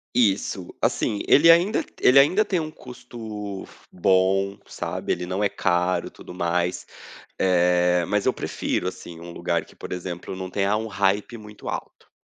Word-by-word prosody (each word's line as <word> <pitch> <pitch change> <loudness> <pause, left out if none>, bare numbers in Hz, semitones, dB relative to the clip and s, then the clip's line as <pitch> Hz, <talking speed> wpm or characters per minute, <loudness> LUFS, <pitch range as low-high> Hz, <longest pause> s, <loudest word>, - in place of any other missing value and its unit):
Isso, 100 -5 +1
assim, 105 - 0
ele 165 +3 +7
ainda 175 +6 +3 0.2
ele 130 - +6
ainda 165 +10 +6
tem 195 -4 -1
um 155 -1 -4
custo 110 -7 -8 0.3
bom, 95 +2 +2
sabe, - - -4
ele 90 0 -5
não 95 +3 -1
é 100 - +3
caro, 90 -1 0
tudo - - -12
mais. 90 0 -1 0.5
Eh, 90 -1 +3
mas 105 +2 0
eu - - +4
prefiro, - - -3
assim, 85 -2 -7
um 85 +1 -9
lugar 85 -1 -1
que - - -19
por - - -9
exemplo, 90 0 -6
não 95 0 -6
tenha 100 +2 +1
um 110 +1 -3
hype 100 +3 0
muito 105 -1 -10
alto. - - -8
95 Hz, 160 wpm, -24 LUFS, 90-110 Hz, 0.5 s, ele